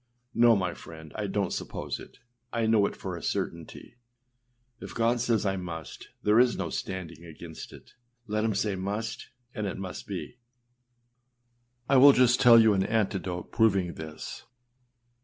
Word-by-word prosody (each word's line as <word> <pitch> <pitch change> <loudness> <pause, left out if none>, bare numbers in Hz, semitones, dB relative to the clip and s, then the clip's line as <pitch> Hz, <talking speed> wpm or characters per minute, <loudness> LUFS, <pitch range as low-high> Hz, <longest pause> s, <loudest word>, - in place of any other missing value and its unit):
â - - -45 0.4
No, 120 -1 +7
my 90 -3 -1
friend, 80 -2 -12
I 105 -1 -3
donât 100 -1 -1
suppose - - -4
it; - - -13 0.3
I 115 -1 0
know 110 -2 +4
it - - -7
for 95 -2 -6
a 85 - -8
certainty. 85 +10 -5 0.8
If - - -9
God 115 +1 +1
says 115 -3 +1
âI 95 -1 -1
must,â 80 -3 -8 0.2
there 105 +2 +4
is 125 -1 +4
no - - -3
standing 85 -3 -5
against 80 -1 -10
it. - - -15 0.3
Let 105 -1 -1
him 110 -2 0
say 105 0 0
âmust,â 100 +4 -4 0.3
and 105 -3 -3
it - - -4
must 95 -2 -7
be. 100 +5 -6 1.5
I 135 - +4
will 140 +2 +9
just 125 -1 +4
tell 120 -1 +8
you 110 -2 +5
an 95 - +1
anecdote 95 -5 -2
proving 95 -6 +2
this. 80 -1 -8
100 Hz, 165 wpm, -28 LUFS, 90-115 Hz, 1.5 s, will